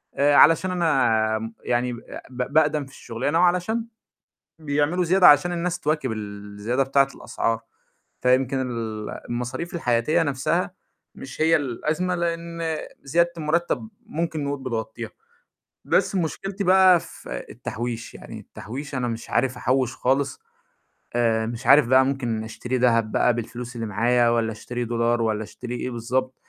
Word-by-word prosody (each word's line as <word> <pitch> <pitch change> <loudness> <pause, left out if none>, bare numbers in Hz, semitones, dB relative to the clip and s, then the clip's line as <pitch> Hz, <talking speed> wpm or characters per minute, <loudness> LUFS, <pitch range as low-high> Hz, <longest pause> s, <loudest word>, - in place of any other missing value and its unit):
آآ 145 +1 +4
علشان 165 +5 +6
أنا 115 -11 +2
آمم 115 +1 -6
يعني 125 0 0
ب 120 - -8 0.3
ب 125 +2 -4
باقدَم 150 -2 +3
في 135 - -16
الشغلانة 135 +7 -2
وعلشان 180 +6 +2 0.7
بيعملوا 155 +4 0
زيادة 185 +1 +6
عشان 150 +5 +5
الناس 175 0 -2
تواكب 150 -6 0
الزيادة 105 +3 -3
بتاعة 135 0 +3
الأسعار، 115 0 -2 0.6
فيمكن 130 +1 +2
ال 115 -4 -4 0.2
المصاريف 125 +9 -4
الحياتية 125 -1 +2
نفْسها، 155 +5 -1 0.4
مش 130 - -10
هي 165 +1 +5
الأزمة 155 +6 -1
لإن 170 -1 -3 0.4
زيادة 170 +5 +2
المرتّب 170 +7 -1 0.2
ممكن 160 -6 -2
نقول 140 0 -3
بتغطّيها، 115 -2 -4 0.8
بس - - +2
مشكلتي 195 +3 -2
بقى 185 -1 +6
في 60 - -8
التحويش، 115 0 -5
يعني - - -9
التحويش 140 +6 -8
أنا 125 -1 -1
مش 115 -1 -5
عارف 125 +1 +1
أحوّش 130 0 0
خالص، 135 +1 0 0.8
آآ 115 -2 +2
مش 115 +1 -6
عارف 140 -2 +7
بقى 130 +2 +5
ممكن 120 -5 -2
أشتري 125 +3 -3
دهب 115 -3 +2
بقى 125 - +3
بالفلوس 120 +1 -6
اللي 115 - -3
معايا 120 +3 +2
والّا 115 -1 +1
أشتري 120 +2 -5
دولار 115 0 +1
والّا 110 -1 0
أشتري 125 +3 -7
إيه 125 - -3
بالضبط، 130 +2 -2
130 Hz, 145 wpm, -24 LUFS, 115-160 Hz, 0.8 s, عارف